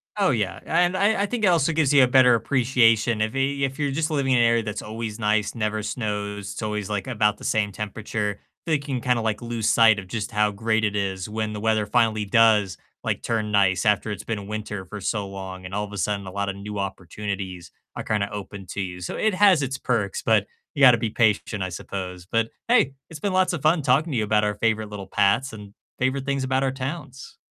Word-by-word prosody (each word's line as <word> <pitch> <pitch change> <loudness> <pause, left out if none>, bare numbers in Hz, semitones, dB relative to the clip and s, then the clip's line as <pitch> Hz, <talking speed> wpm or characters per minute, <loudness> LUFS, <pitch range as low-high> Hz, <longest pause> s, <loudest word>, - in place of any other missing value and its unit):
Oh, 195 -6 +2
yeah 105 -7 -1
and 175 +2 +2
I 200 +1 +2
I - - +2
think 225 +1 -3
it - - +5
also 165 -3 +3
gives 150 -2 +2
you 135 -2 +7
a - - +5
better 125 -1 +6
appreciation, 115 -3 +2
if 110 +1 0
y 135 +1 0
if 135 -1 -1
you're 145 -2 -1
just 160 +3 -1
living 140 -3 +1
in 120 - +4
an 120 - +5
area 115 -1 +3
that's 105 -1 -4
always 110 0 -6
nice, 105 -1 +1
never 110 -2 -2
snows, 105 -3 -4
it's - - -7
always, 105 -2 -3
like, 105 +3 -3
about 105 -4 +1
the - - -14
same 105 -2 0
temperature, 105 0 -4 0.3
think 150 -3 -1
you 135 - -2
can 120 - -3
kinda, 125 -1 +1
like, 110 0 -1
lose 115 -2 -1
sight 110 -3 +5
of 95 - -9
just 110 +3 -4
how 105 -1 +2
great 110 +2 0
it 105 -1 0
is 95 -2 -2
when 110 0 -3
the 105 - -5
weather 110 -1 +1
finally 110 -1 +1
does, 105 -2 +3 0.3
like, - - -2
turn 110 -2 -2
nice 95 -1 +3
after 105 +1 +2
it's 105 - -5
been 110 -2 -3
a 100 - -8
winter 105 -2 -5
for 105 +3 -8
so 100 0 -2
long, 95 -1 -8
and 95 - -8
all 105 - -1
of 105 - -12
a - - -6
sudden, 100 +1 -1
a - - -6
lotta 100 0 -2
new 100 +1 -7
opportunities 95 -1 -5 0.2
are - - -4
kinda 105 -1 -1
open 100 -1 -7
to 100 - -4
you, 90 -1 -5
so 85 - -4
it 220 -1 +1
has 190 -5 +5
its 135 0 -2
perks, 105 -7 -1
but 110 -3 +3 0.3
you 145 - -4
gotta 125 -3 +8
be 115 -1 -2
patient, 105 -2 +1
I 95 - -3
suppose, 90 0 -6
but 115 +3 0 0.2
hey, 225 - +3 0.2
it's 160 -2 -9
been 200 +2 -2
lots 185 -1 +2
of 170 - -3
fun 155 +2 +3
talking 140 +5 +2
to 130 - -1
you 110 - +1
about 105 0 +2
our 105 -1 0
favorite 110 0 0
little 100 -2 -7
paths 105 +7 +1
and 105 -2 -10 0.3
favorite 130 +1 0
things 140 -1 -1
about 130 +1 0
our 135 - +1
towns. 135 0 -7
110 Hz, 240 wpm, -24 LUFS, 105-130 Hz, 0.3 s, gotta